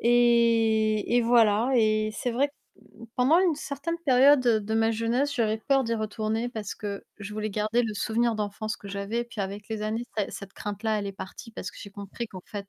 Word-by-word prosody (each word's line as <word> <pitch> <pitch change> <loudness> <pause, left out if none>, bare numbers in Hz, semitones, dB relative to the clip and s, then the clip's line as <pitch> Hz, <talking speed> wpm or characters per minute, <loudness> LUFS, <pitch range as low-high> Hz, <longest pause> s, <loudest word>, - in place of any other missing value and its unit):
et 230 -2 +3
et 245 - +4
voilà 230 0 +4
et 215 -1 +2
c'est 245 +3 -2
vrai, 280 +4 +1 0.7
pendant 265 +7 +5
une 360 -3 +3
certaine 300 +3 -4
période 270 +2 +6
de 220 -3 +1
ma 225 0 +3
jeunesse, 235 +6 0
j'avais 220 -2 +1
peur 270 +3 +2
d'y 230 0 -1
retourner 220 +1 -2
parce 220 -4 -5
que 200 -2 -6
je 205 +1 -7
voulais 215 0 -2
garder 215 +4 +1
le 220 - -2
souvenir 230 +3 +1
d'enfance 215 +1 -3
que 200 - -11
j'avais. 200 +4 -2
Puis 235 -3 -7
avec 200 +2 -6
les 220 -1 -4
années, 220 +3 -2
cet 205 -2 -1
cette 195 -1 -8
crainte-là, 210 +1 -2
elle 200 - -3
est 200 - -4
partie 195 +4 -9
parce 185 -4 -6
que - - -17
j'ai 200 - -9
compris 200 +4 -6
qu'en 185 -3 -10
fait, 200 -2 -7
220 Hz, 205 wpm, -27 LUFS, 210-240 Hz, 0.7 s, période